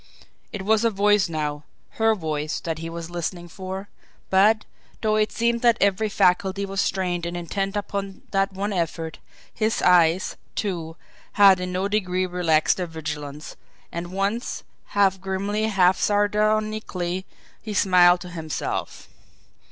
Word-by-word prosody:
It 200 Hz, -3 st, -5 dB
was 220 Hz, +2 st, +3 dB
a 230 Hz, -, +4 dB
voice 205 Hz, -2 st, +3 dB
now, 150 Hz, -2 st, -3 dB, 0.4 s
her 225 Hz, 0 st, +4 dB
voice, 155 Hz, -4 st, -3 dB
that 165 Hz, -2 st, -3 dB
he 165 Hz, 0 st, -5 dB
was 170 Hz, 0 st, -7 dB
listening 175 Hz, 0 st, -4 dB
for; 190 Hz, +2 st, -7 dB, 0.4 s
but, 210 Hz, +3 st, +4 dB, 0.4 s
though 215 Hz, -1 st, +2 dB
it 215 Hz, 0 st, +1 dB
seemed 235 Hz, 0 st, 0 dB
that 235 Hz, -1 st, +4 dB
every 200 Hz, +2 st, +2 dB
faculty 190 Hz, +1 st, +2 dB
was 195 Hz, 0 st, -1 dB
strained 180 Hz, -2 st, -1 dB
and 175 Hz, +1 st, -4 dB
intent 195 Hz, +4 st, -2 dB
upon 200 Hz, -1 st, -4 dB
that 195 Hz, 0 st, +1 dB
one 200 Hz, +2 st, -3 dB
effort, 165 Hz, -2 st, -3 dB, 0.3 s
his 220 Hz, +1 st, 0 dB
eyes, 175 Hz, 0 st, +4 dB, 0.2 s
too, 170 Hz, -6 st, -3 dB, 0.4 s
had 195 Hz, -2 st, +7 dB
in 180 Hz, 0 st, -3 dB
no 185 Hz, +2 st, -1 dB
degree 185 Hz, -3 st, 0 dB
relaxed 175 Hz, -4 st, +2 dB
their 180 Hz, -2 st, -2 dB
vigilance 150 Hz, -2 st, -6 dB, 0.4 s
and 170 Hz, +1 st, -5 dB
once, 200 Hz, +5 st, -2 dB, 0.2 s
half 195 Hz, -2 st, +2 dB
grimly, 200 Hz, +3 st, -1 dB
half 190 Hz, -3 st, +3 dB
sardonically, 210 Hz, -3 st, 0 dB, 0.3 s
he 215 Hz, -2 st, -6 dB
smiled 180 Hz, -2 st, +5 dB
to 180 Hz, -, -8 dB
himself. 160 Hz, -3 st, -4 dB
190 Hz, 145 wpm, -24 LUFS, 175-205 Hz, 0.4 s, had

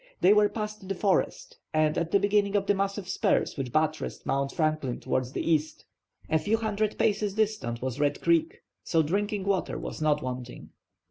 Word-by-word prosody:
They 190 Hz, +3 st, +6 dB
were 210 Hz, 0 st, +4 dB
past 210 Hz, -3 st, -5 dB
the 195 Hz, -, -1 dB
forest 190 Hz, +1 st, 0 dB, 0.2 s
and 155 Hz, 0 st, +3 dB
at 170 Hz, -1 st, -1 dB
the 200 Hz, -, +4 dB
beginning 205 Hz, 0 st, +2 dB
of 200 Hz, -1 st, +2 dB
the 205 Hz, -, +3 dB
massive 195 Hz, -1 st, -2 dB
spurs 190 Hz, -, +1 dB
which 135 Hz, -4 st, -4 dB
buttressed 155 Hz, +2 st, -1 dB
Mount 135 Hz, 0 st, 0 dB
Franklin 155 Hz, -5 st, -1 dB
towards 130 Hz, -1 st, -1 dB
the -, -, -3 dB
east. 155 Hz, -1 st, 0 dB, 0.4 s
A 160 Hz, -, +2 dB
few 215 Hz, +7 st, +1 dB
hundred 215 Hz, -1 st, -1 dB
paces 205 Hz, -1 st, +1 dB
distant 210 Hz, -, -1 dB
was 130 Hz, 0 st, -3 dB
Red 145 Hz, -1 st, +1 dB
Creek; 170 Hz, -1 st, +1 dB, 0.2 s
so 165 Hz, -1 st, +2 dB
drinking 200 Hz, +5 st, -1 dB
water 195 Hz, -1 st, 0 dB
was -, -, -6 dB
not 150 Hz, -1 st, +2 dB
wanting. 125 Hz, -1 st, -6 dB
180 Hz, 185 wpm, -28 LUFS, 150-205 Hz, 0.4 s, They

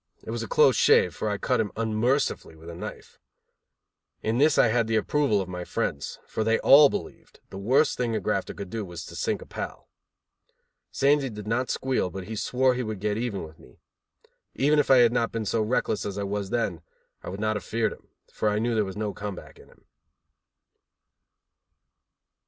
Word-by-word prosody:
It -, -, -6 dB
was -, -, -3 dB
a -, -, -4 dB
close 465 Hz, -2 st, +4 dB
shave, 470 Hz, +1 st, +4 dB
for 110 Hz, -, -3 dB
I 105 Hz, -, -1 dB
cut -, -, 0 dB
him 110 Hz, -2 st, -1 dB
unmercifully 115 Hz, -, 0 dB
with 80 Hz, +2 st, -11 dB
a -, -, -9 dB
knife. -, -, -9 dB, 1.0 s
In 110 Hz, +3 st, 0 dB
this 150 Hz, +1 st, +4 dB
I 115 Hz, -, +5 dB
had 115 Hz, 0 st, +1 dB
the 115 Hz, -, 0 dB
approval 120 Hz, -3 st, +2 dB
of 95 Hz, -, -5 dB
my 90 Hz, -1 st, -5 dB
friends, 70 Hz, -4 st, -3 dB
for 110 Hz, -, -2 dB
they 115 Hz, +1 st, +2 dB
all 145 Hz, +1 st, +8 dB
believed -, -, -7 dB
the 95 Hz, -, -7 dB
worst 135 Hz, +9 st, +2 dB
thing 120 Hz, -2 st, 0 dB
a -, -, 0 dB
grafter 95 Hz, -, -2 dB
could 100 Hz, -3 st, -7 dB
do 115 Hz, -2 st, -3 dB
was 85 Hz, -3 st, -8 dB
to -, -, -10 dB
sink -, -, -2 dB
a -, -, -16 dB
pal. -, -, -7 dB, 1.0 s
Sandy 140 Hz, 0 st, +2 dB
did 105 Hz, -2 st, -8 dB
not 120 Hz, +4 st, -1 dB
squeal, 130 Hz, -8 st, 0 dB
but 95 Hz, +1 st, -7 dB
he 110 Hz, +4 st, -6 dB
swore 125 Hz, +4 st, +2 dB
he 125 Hz, -, -2 dB
would 110 Hz, -4 st, -4 dB
get 105 Hz, +1 st, -1 dB
even 115 Hz, -6 st, -3 dB
with 80 Hz, -1 st, -12 dB
me. 60 Hz, -, -18 dB, 0.8 s
Even 150 Hz, +2 st, +3 dB
if 145 Hz, -, +1 dB
I 135 Hz, -, +7 dB
had 120 Hz, -1 st, +5 dB
not 115 Hz, -2 st, 0 dB
been 115 Hz, -1 st, -3 dB
so 110 Hz, +2 st, 0 dB
reckless 110 Hz, -2 st, 0 dB
as 100 Hz, -1 st, -5 dB
I 100 Hz, -, -2 dB
was 100 Hz, 0 st, -3 dB
then, 100 Hz, -9 st, -1 dB, 0.4 s
I -, -, -7 dB
would 95 Hz, +2 st, -6 dB
not 110 Hz, 0 st, 0 dB
have 105 Hz, -, -4 dB
feared 115 Hz, +4 st, -1 dB
him, -, -, -18 dB, 0.3 s
for 105 Hz, -, 0 dB
I 105 Hz, -, 0 dB
knew 115 Hz, +2 st, 0 dB
there 110 Hz, -1 st, +2 dB
was 95 Hz, 0 st, -6 dB
no 105 Hz, -1 st, -2 dB
come 105 Hz, -1 st, -5 dB
back -, -, -13 dB
in -, -, -16 dB
him. -, -, -24 dB
110 Hz, 210 wpm, -26 LUFS, 100-125 Hz, 1.0 s, all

